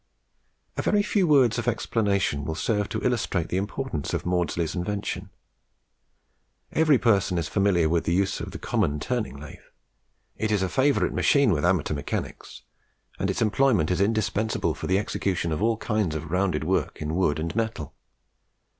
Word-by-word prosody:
A -, -, +1 dB
very 205 Hz, -1 st, +2 dB
few 200 Hz, -3 st, +1 dB
words 130 Hz, -6 st, +4 dB
of 120 Hz, -, -4 dB
explanation 100 Hz, -9 st, 0 dB
will 80 Hz, +2 st, -3 dB
serve 105 Hz, +2 st, -1 dB
to -, -, -3 dB
illustrate 110 Hz, -9 st, 0 dB
the 90 Hz, -, -1 dB
importance 100 Hz, -, -3 dB
of -, -, -3 dB
Maudslay's 85 Hz, -2 st, 0 dB
invention. 95 Hz, 0 st, -3 dB, 1.4 s
Every 155 Hz, -3 st, +4 dB
person 100 Hz, -7 st, +2 dB
is 85 Hz, -2 st, -1 dB
familiar 100 Hz, -5 st, +2 dB
with 85 Hz, +1 st, 0 dB
the 85 Hz, -, +1 dB
uses 95 Hz, +1 st, 0 dB
of -, -, -5 dB
the -, -, -7 dB
common 90 Hz, -11 st, -1 dB
turning 115 Hz, -, -3 dB
lathe. 75 Hz, -, -10 dB, 0.8 s
It 110 Hz, -1 st, -1 dB
is 100 Hz, -3 st, +2 dB
a 95 Hz, -, -1 dB
favourite 140 Hz, +6 st, +2 dB
machine 140 Hz, -5 st, +3 dB
with 75 Hz, -5 st, 0 dB
amateur 90 Hz, -3 st, +1 dB
mechanics, 70 Hz, -, -5 dB, 0.6 s
and -, -, 0 dB
its -, -, 0 dB
employment 110 Hz, -, +2 dB
is 90 Hz, -, +1 dB
indispensable 110 Hz, +1 st, 0 dB
for -, -, -6 dB
the 95 Hz, -, +3 dB
execution 95 Hz, -4 st, -1 dB
of 80 Hz, -, -2 dB
all 115 Hz, 0 st, +2 dB
kinds 105 Hz, -8 st, -1 dB
of 80 Hz, 0 st, -5 dB
rounded 90 Hz, +1 st, 0 dB
work -, -, -1 dB
in 75 Hz, +1 st, -3 dB
wood 85 Hz, -4 st, +1 dB
and 80 Hz, +5 st, -3 dB
metal. 110 Hz, -10 st, -3 dB
100 Hz, 170 wpm, -25 LUFS, 85-115 Hz, 1.4 s, words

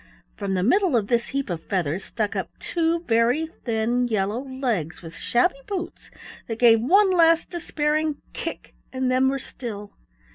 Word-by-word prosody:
From 195 Hz, -2 st, -2 dB
the 180 Hz, -, 0 dB
middle 370 Hz, -, +3 dB
of 205 Hz, -3 st, -1 dB
this 235 Hz, -1 st, +1 dB
heap 275 Hz, 0 st, -2 dB
of 165 Hz, -2 st, -3 dB
feathers 180 Hz, -2 st, -1 dB
stuck 215 Hz, -3 st, -2 dB
up -, -, -2 dB
two 335 Hz, -1 st, 0 dB
very 240 Hz, +2 st, +2 dB
thin 240 Hz, -4 st, -1 dB
yellow 210 Hz, 0 st, 0 dB
legs 245 Hz, -, -3 dB
with 165 Hz, -1 st, -9 dB
shabby 275 Hz, +4 st, +1 dB
boots 365 Hz, -3 st, -5 dB, 0.4 s
that 225 Hz, -, -4 dB
gave 230 Hz, -2 st, +6 dB
one 380 Hz, -, +5 dB
last 330 Hz, -2 st, +4 dB
despairing 305 Hz, -3 st, -1 dB
kick -, -, -6 dB, 0.2 s
and 260 Hz, -1 st, -1 dB
then 260 Hz, +1 st, +3 dB
were 275 Hz, -, -1 dB
still. 210 Hz, -6 st, -8 dB
250 Hz, 160 wpm, -24 LUFS, 220-315 Hz, 0.4 s, gave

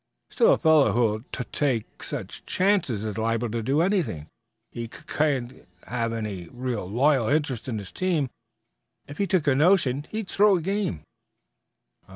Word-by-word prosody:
"Still 475 Hz, +1 st, +4 dB
a -, -, +2 dB
fellow 160 Hz, -3 st, +4 dB
who'll 110 Hz, -2 st, +1 dB
tut 125 Hz, -, -5 dB
take 130 Hz, -7 st, -1 dB
such -, -, -6 dB
chances 180 Hz, -, +1 dB
is 105 Hz, 0 st, -3 dB
liable 115 Hz, +1 st, 0 dB
to 115 Hz, 0 st, -2 dB
do 135 Hz, +7 st, +1 dB
anything. 170 Hz, -, 0 dB, 0.5 s
He 115 Hz, -1 st, -5 dB
cuc -, -, -14 dB
can't 135 Hz, -5 st, -1 dB, 0.2 s
have 115 Hz, +1 st, -2 dB
any 105 Hz, -6 st, -4 dB
real 120 Hz, -7 st, -4 dB
loyal 130 Hz, +2 st, +3 dB
interest 140 Hz, -6 st, 0 dB
in 115 Hz, -, -2 dB
his 100 Hz, -3 st, -7 dB
team. 165 Hz, -8 st, 0 dB, 0.8 s
If 145 Hz, -, -10 dB
he 200 Hz, -, +1 dB
took 175 Hz, -3 st, +1 dB
a 140 Hz, -, +4 dB
notion, 145 Hz, -3 st, +3 dB
he'd 215 Hz, -2 st, -4 dB
throw 205 Hz, 0 st, +4 dB
a -, -, -3 dB
game." 195 Hz, -, -2 dB
130 Hz, 165 wpm, -25 LUFS, 115-165 Hz, 0.8 s, Still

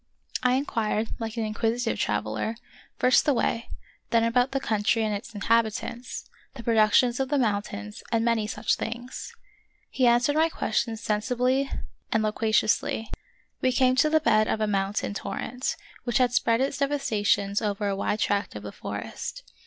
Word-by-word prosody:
I 250 Hz, 0 st, +3 dB
inquired, 225 Hz, -5 st, 0 dB
like 225 Hz, 0 st, -4 dB
an 225 Hz, -, 0 dB
inquisitive 225 Hz, +2 st, -1 dB
traveler, 110 Hz, -, -1 dB, 0.4 s
first 255 Hz, 0 st, +4 dB
the 290 Hz, -, +2 dB
way, 230 Hz, 0 st, -1 dB, 0.4 s
then 230 Hz, -1 st, +3 dB
about 245 Hz, +3 st, +3 dB
the 270 Hz, -, 0 dB
country 220 Hz, -2 st, +1 dB
and 215 Hz, -1 st, 0 dB
its 205 Hz, +2 st, -6 dB
inhabitants, 230 Hz, +3 st, -1 dB, 0.3 s
the 240 Hz, -, -8 dB
productions 230 Hz, +2 st, +4 dB
of 265 Hz, -1 st, 0 dB
the 290 Hz, -, +2 dB
mountains, 205 Hz, -, -2 dB
and 230 Hz, -1 st, +2 dB
many 230 Hz, -2 st, +1 dB
such 210 Hz, +1 st, 0 dB
things. 240 Hz, +2 st, -5 dB, 0.6 s
He 255 Hz, -2 st, +3 dB
answered 240 Hz, +4 st, +4 dB
my 320 Hz, +1 st, +4 dB
questions 225 Hz, -5 st, -1 dB
sensibly 250 Hz, +5 st, +1 dB, 0.4 s
and 220 Hz, -1 st, +2 dB
loqua 215 Hz, +1 st, 0 dB
ciously. 215 Hz, +1 st, +1 dB, 0.5 s
We 255 Hz, -, +3 dB
came 255 Hz, 0 st, +3 dB
to 305 Hz, -, +4 dB
the 315 Hz, 0 st, +4 dB
bed 215 Hz, -8 st, +3 dB
of -, -, 0 dB
a 215 Hz, -, +2 dB
mountain 200 Hz, 0 st, -1 dB
torrent, 255 Hz, +8 st, -3 dB, 0.3 s
which 240 Hz, -1 st, 0 dB
had 250 Hz, -2 st, +3 dB
spread 230 Hz, 0 st, +2 dB
its 270 Hz, +1 st, -1 dB
devastations 215 Hz, -8 st, +1 dB
over 205 Hz, -1 st, -1 dB
a 200 Hz, -, 0 dB
wide 205 Hz, +2 st, -1 dB
tract 205 Hz, 0 st, 0 dB
of -, -, -7 dB
the -, -, -6 dB
forest. -, -, -6 dB
230 Hz, 165 wpm, -26 LUFS, 215-255 Hz, 0.6 s, first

